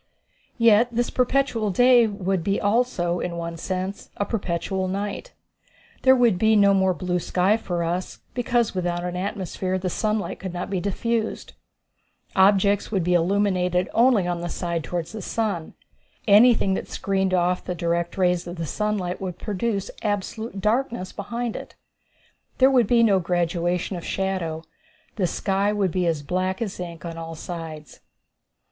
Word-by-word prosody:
Yet 230 -1 +5
this 240 +1 -1
perpetual 250 -4 +1
day 245 +3 +5
would 195 -4 -2
be 200 +3 0
also, 205 -6 +1
in 170 -1 -3
one 170 0 -4
sense, 185 +3 -4
a 205 - 0
perpetual 190 -2 -2
night. 200 - -4 0.7
There 260 0 +6
would 235 -7 +3
be 220 +1 +4
no 200 -1 +5
more 190 -1 +2
blue 180 -1 -1
sky 185 +4 +2
for 175 -6 -2
us, 175 +2 -3 0.2
because 240 -2 +1
without 175 -2 -2
an 180 0 -3
atmosphere 190 -1 -2
the 185 -1 -3
sunlight 215 +1 -1
could 185 -2 -6
not 175 - -4
be 190 - 0
diffused. 220 +4 -2 0.8
Objects 200 +1 +4
would 195 -5 +1
be 180 +1 +1
illuminated 180 0 +1
only 235 -5 +4
on 175 -1 -2
the 175 - -4
side 170 -1 -3
toward 175 0 -3
the 215 +5 -8
sun. 200 -7 -2 0.5
Anything 210 -1 +6
that - - -3
screened 190 -1 0
off 180 0 +1
the 180 - -4
direct 170 +1 -1
rays 180 -2 +1
of 170 -2 -5
sunlight 205 -3 -2
would 180 -2 -4
produce 200 +1 -2
absolute 210 +1 -3
darkness 225 -2 0
behind 235 +3 -4
it. - - -8 0.8
There 265 +1 +5
would 245 -5 +4
be 235 0 +4
no 200 -4 +4
graduation 175 +1 -1
of 170 - -7
shadow. 180 -5 -2 0.5
The 185 -4 +1
sky 195 +4 0
would 200 -4 0
be 180 0 0
as 160 -3 -1
black 185 +4 -1
as 210 -6 -4
ink 170 -2 -7
on 165 -1 -6
all 165 0 -6
sides. 160 -2 -8
190 Hz, 160 wpm, -24 LUFS, 175-215 Hz, 0.8 s, There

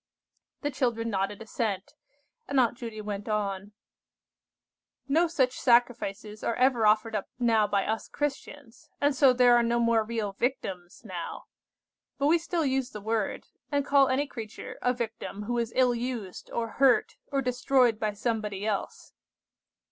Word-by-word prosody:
The 290 - -1
children 235 -4 -1
nodded 200 +2 -2
assent, 210 -3 -3 0.5
and 280 -1 +2
Aunt 240 -1 +3
Judy 230 -3 -7
went 205 0 -5
on:— 205 -1 -2 1.3
"No 325 +5 +3
such 260 -6 0
sacrifices 230 -4 +1
are 230 - 0
ever 250 -3 +3
offered 215 +1 +3
up 205 - -3
now 225 -4 +3
by 200 -1 +1
us 220 +1 -2
Christians, 290 -3 -5
and 285 0 +3
so 265 -1 +6
there 245 -1 +5
are 240 - +5
no 235 0 +1
more 230 -1 +3
real 220 -2 -3
victims 195 -7 -3
now. 180 -5 -6 0.7
But 280 - 0
we 330 +3 +4
still 335 -1 -1
use 265 -1 0
the 210 - -8
word, 220 0 -2 0.3
and 285 -1 +1
call 275 -2 +4
any 265 +3 +1
creature 225 -6 -8
a 250 - +2
victim 225 -4 -5
who 240 +3 -1
is 230 -1 -2
ill 255 -1 +4
used, 235 -6 -5
or 230 -1 -2
hurt, 265 -3 +4
or 275 -1 0
destroyed 250 -2 +2
by 215 -1 -1
somebody 210 -2 -2
else. 210 -2 -3
235 Hz, 155 wpm, -28 LUFS, 210-260 Hz, 1.3 s, so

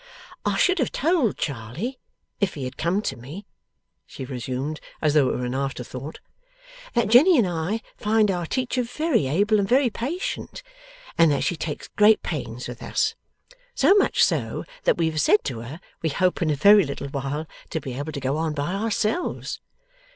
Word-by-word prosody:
'I - - +1
should 370 -1 +3
have 260 - 0
told 305 - +1
Charley, 140 - -4 0.4
if 200 -3 0
he 140 - -5
had 130 +1 -5
come 185 +6 0
to - - -2
me,' 145 - -9 0.6
she 130 - -7
resumed, 130 +4 -4 0.2
as 150 -2 +2
though 145 -4 +4
it - - -1
were 125 - -3
an 125 - -3
after 135 -1 -2
thought, 130 +5 -8 0.8
'that 235 -2 +3
Jenny 295 +10 +7
and 235 - +4
I 175 +6 -2 0.2
find 215 -1 +2
our 175 -3 -2
teacher 255 +2 -1
very 245 - 0
able 205 +9 +2
and 195 - 0
very 255 -1 +4
patient, 340 - -4 0.6
and 165 -1 +7
that 140 - +1
she 175 - 0
takes 155 -2 -5
great 210 +1 +4
pains - - -4
with - - -8
us. - - 0 0.6
So - - +5
much 405 -1 +3
so, - - 0 0.2
that - - +3
we 170 - +2
have 155 -1 0
said 210 - +4
to 125 -5 -4
her 125 +8 -8 0.2
we 160 - 0
hope 180 +5 +1
in 165 - +2
a 150 - +2
very 200 +7 +7
little 140 -1 -5
while 140 +3 -3 0.2
to 160 - -2
be 130 -4 -6
able 145 +5 -4
to 140 - -5
go 135 +2 -1
on 160 -1 -1
by 145 +5 -2
ourselves. 220 - -1
165 Hz, 190 wpm, -24 LUFS, 140-225 Hz, 0.8 s, Jenny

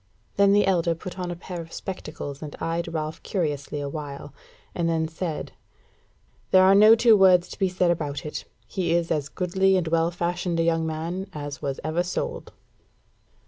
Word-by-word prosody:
Then 200 0 +5
the 205 +1 +4
elder 170 -3 +2
put 185 +3 -8
on 180 -1 -3
a 175 - -3
pair 175 0 -7
of 165 0 -11
spectacles 150 -6 -6
and 150 -2 -7
eyed 165 0 -2
Ralph 155 -1 -4
curiously 150 -5 -2
a 145 - -3
while, 140 -1 -7 0.4
and 170 -1 0
then 160 -1 0
said: 160 0 -4 1.0
"There 185 0 +6
are 190 +1 +6
no 215 +3 +8
two 230 -1 +6
words 185 -3 +5
to - - -10
be 190 - +2
said 180 -1 +2
about 150 -4 -3
it; 150 - -5 0.2
he 165 +9 -1
is 170 -1 0
a 155 -2 +2
goodly 190 +1 +2
and 175 -3 -1
well 165 +1 +2
fashioned 175 0 -2
a - - +3
young 165 -1 +1
man 170 +5 -4
as 145 0 -6
was 140 -2 -3
ever 155 +3 0
sold." 330 - -4
170 Hz, 185 wpm, -25 LUFS, 155-185 Hz, 1.0 s, no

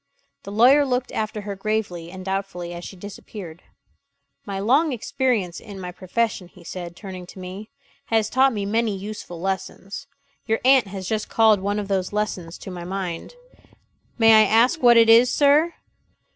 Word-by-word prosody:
The 200 - -9
lawyer 250 +7 +6
looked 255 -2 -1
after 215 0 -3
her 200 0 -5
gravely 195 -5 -3
and 185 +1 -9
doubtfully 190 -3 -4
as 175 0 -8
she 195 - -8
disappeared. 185 -3 -10 0.9
"My 200 -1 -4
long 275 +10 +3
experience 230 -6 -1
in 200 -3 -10
my 180 -1 -6
profession," 190 +1 -2
he 175 0 -18
said, 175 0 -7
turning 185 -3 -9
to - - -13
me, 190 +4 -8 0.4
"has 220 -1 +1
taught 265 +3 +3
me 205 -4 -3
many 220 0 0
useful 195 -3 -7
lessons. 190 +1 -5 0.4
Your 225 -1 +1
aunt 260 -4 +5
has 190 -1 -6
just 215 0 -2
called 220 -2 +4
one 200 +2 -2
of 205 -1 -3
those 190 -2 -1
lessons 190 -5 -3
to 190 - -9
my 175 -1 -7
mind. 180 - -5 0.8
"May 225 -1 +6
I - - +1
ask 245 +9 +3
what 240 -2 +7
it 230 -1 +6
is, 230 +2 +6
sir?" 300 +4 +3
205 Hz, 170 wpm, -23 LUFS, 185-230 Hz, 0.9 s, what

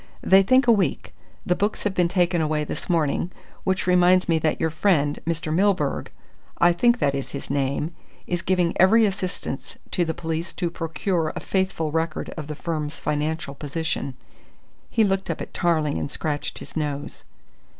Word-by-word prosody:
"They 190 +1 +7
think 255 +7 +4
a 240 - +6
week. 200 -6 0 0.3
The 180 - +3
books 205 +3 -1
have 205 - 0
been 180 -2 +3
taken 175 -1 +2
away 155 -1 0
this 150 - -5
morning 165 +1 +1 0.3
which 190 -1 0
reminds 180 0 +4
me 165 -2 +3
that 155 0 0
your 160 - +1
friend, 155 -4 +2
Mr. 165 -1 -1
Milburgh 185 -5 +1 0.5
I 175 0 +5
think 240 +7 +3
that 140 - +1
is 135 -1 -4
his 140 - -5
name 140 +3 -1 0.3
is 175 -1 -2
giving 180 -2 +1
every 220 +4 +6
assistance 185 -8 -3
to 175 - +1
the 160 -1 -2
police 165 +1 -3
to 170 -2 -1
procure 165 0 -1
a - - -3
faithful 190 -5 -1
record 160 0 -2
of 155 -3 -7
the 150 - -5
firm's 155 -1 -4
financial 155 0 -2
position." 145 -2 -3 0.7
He 225 - +3
looked 195 -1 0
up - - -2
at - - -7
Tarling 155 -4 +1
and - - -3
scratched 150 0 -3
his - - -9
nose. 145 -2 -3
165 Hz, 175 wpm, -24 LUFS, 150-185 Hz, 0.7 s, They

